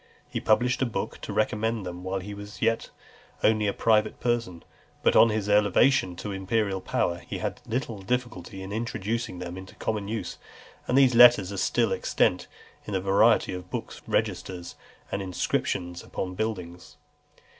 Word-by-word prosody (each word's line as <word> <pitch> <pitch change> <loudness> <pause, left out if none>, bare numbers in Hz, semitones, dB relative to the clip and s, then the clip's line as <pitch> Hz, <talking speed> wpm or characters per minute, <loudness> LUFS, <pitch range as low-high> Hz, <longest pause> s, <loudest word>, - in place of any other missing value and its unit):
He - - -3
published 125 +4 +2
a 130 - +2
book 115 - -4
to - - -6
recommend 110 0 0
them 90 0 -6
while 95 +1 -2
he 100 +2 -7
was 105 0 -9
yet 115 0 +1 0.5
only 110 -1 +3
a - - +2
private 110 +1 +2
person; 115 -8 -1 0.4
but - - +4
on 115 - +7
his 105 -2 -1
elevation 105 -1 +3
to 105 +4 -5
imperial 95 0 -1
power 85 -1 -1
he - - -6
had - - -4
little 115 -4 -3
difficulty 105 -5 -3
in 95 - -7
introducing 110 -1 -3
them 90 +1 -6
into 95 0 -12
common 105 -2 -3
use; 110 +1 -4 0.5
and 125 - +2
these 135 -2 +6
letters 120 -5 +7
are 100 - -5
still - - +1
extant - - +1 0.4
in 105 - -3
a - - +2
variety 100 +3 +3
of 90 0 -7
books, - - -6
registers, 90 -2 -2 0.4
and 100 - -2
inscriptions 90 -1 -2
upon 90 -1 -4
buildings. 90 -4 -5
105 Hz, 165 wpm, -27 LUFS, 95-115 Hz, 0.5 s, on